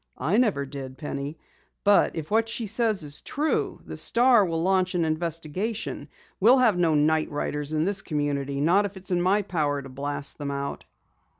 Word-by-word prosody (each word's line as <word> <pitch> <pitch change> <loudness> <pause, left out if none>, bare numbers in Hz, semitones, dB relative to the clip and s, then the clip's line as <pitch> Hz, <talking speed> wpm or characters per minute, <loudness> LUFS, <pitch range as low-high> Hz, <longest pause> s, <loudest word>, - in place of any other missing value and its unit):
"I 160 +11 +1
never 200 - +1
did, 135 -1 -8
Penny. 145 0 -5 0.5
But 205 0 +4
if 160 0 -6
what 225 +1 +2
she 230 0 -3
says 215 -3 0
is 145 -1 -4
true, 300 +3 -1
the - - -7
Star 240 -2 +4
will 165 -3 -1
launch 185 0 +1
an 170 -2 +1
investigation. 165 +2 -3 0.3
We'll 235 +7 +6
have 240 -6 +4
no 170 -3 +2
night 155 +1 +2
riders 145 0 -3
in 155 0 +1
this 195 +2 +2
community, 140 -2 -2
not 185 +7 +4
if 200 -1 -6
it's 190 0 -5
in 175 -1 +2
my 195 +4 +2
power 150 -6 -1
to 135 -1 -9
blast 140 +2 -2
them 145 -1 -3
out!" 140 0 -4
165 Hz, 185 wpm, -26 LUFS, 145-200 Hz, 0.5 s, We'll